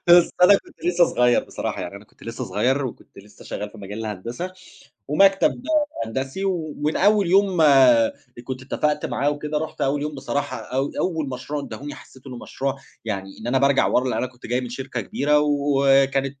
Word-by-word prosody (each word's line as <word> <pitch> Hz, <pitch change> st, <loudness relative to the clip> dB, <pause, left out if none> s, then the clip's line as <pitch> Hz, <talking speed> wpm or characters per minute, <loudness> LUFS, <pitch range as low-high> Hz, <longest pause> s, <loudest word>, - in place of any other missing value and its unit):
بس 175 Hz, 0 st, +7 dB
أنا 180 Hz, -, +8 dB
كنت -, -, -5 dB
لسّه 175 Hz, 0 st, +4 dB
صغيّر 125 Hz, -5 st, +2 dB
بصراحة، -, -, -4 dB
يعني 100 Hz, -, -6 dB
أنا 100 Hz, -, -13 dB
كنت -, -, -25 dB
لسّه 115 Hz, 0 st, -5 dB
صغيّر 135 Hz, +3 st, 0 dB
وكنت 115 Hz, -, -11 dB
لسّه 105 Hz, +1 st, -15 dB
شغّال 105 Hz, 0 st, -5 dB
في 110 Hz, -, -14 dB
مجال 100 Hz, +2 st, -7 dB
الهندسة 115 Hz, -, -5 dB, 0.6 s
ومكتب 195 Hz, -, +3 dB, 0.4 s
هندسي 135 Hz, +11 st, -4 dB
و 165 Hz, -6 st, -2 dB
ومن 150 Hz, +2 st, -1 dB
أول 205 Hz, -1 st, +4 dB
يوم 190 Hz, -1 st, +3 dB
أ 130 Hz, -6 st, +6 dB, 0.3 s
كنت 130 Hz, 0 st, -6 dB
اتّفقت 150 Hz, +3 st, -1 dB
معاه 145 Hz, -, 0 dB
وكده، 150 Hz, +1 st, -3 dB
رُحت 155 Hz, +1 st, -5 dB
أول 140 Hz, +1 st, +1 dB
يوم 150 Hz, 0 st, -3 dB
بصراحة 140 Hz, +1 st, -3 dB
أو 135 Hz, +2 st, -3 dB
أول 160 Hz, -6 st, -1 dB
مشروع 130 Hz, +3 st, -4 dB
ادّاهوني، 145 Hz, +1 st, -7 dB
حسّيت 130 Hz, +1 st, -15 dB
إنه 125 Hz, -2 st, -7 dB
مشروع 135 Hz, +2 st, -3 dB, 0.3 s
يعني 95 Hz, -3 st, -5 dB
إن 110 Hz, -, -7 dB
أنا 130 Hz, +2 st, +2 dB
بارجع 140 Hz, 0 st, +3 dB
ورا، 125 Hz, -, +2 dB
لإن -, -, -1 dB
أنا 130 Hz, -, -1 dB
كنت 125 Hz, 0 st, -15 dB
جاي 125 Hz, +2 st, -1 dB
من 125 Hz, -, -6 dB
شركة 125 Hz, 0 st, -5 dB
كبيرة 145 Hz, +8 st, +1 dB
وكانت 140 Hz, -2 st, +2 dB
135 Hz, 190 wpm, -23 LUFS, 125-150 Hz, 0.6 s, أنا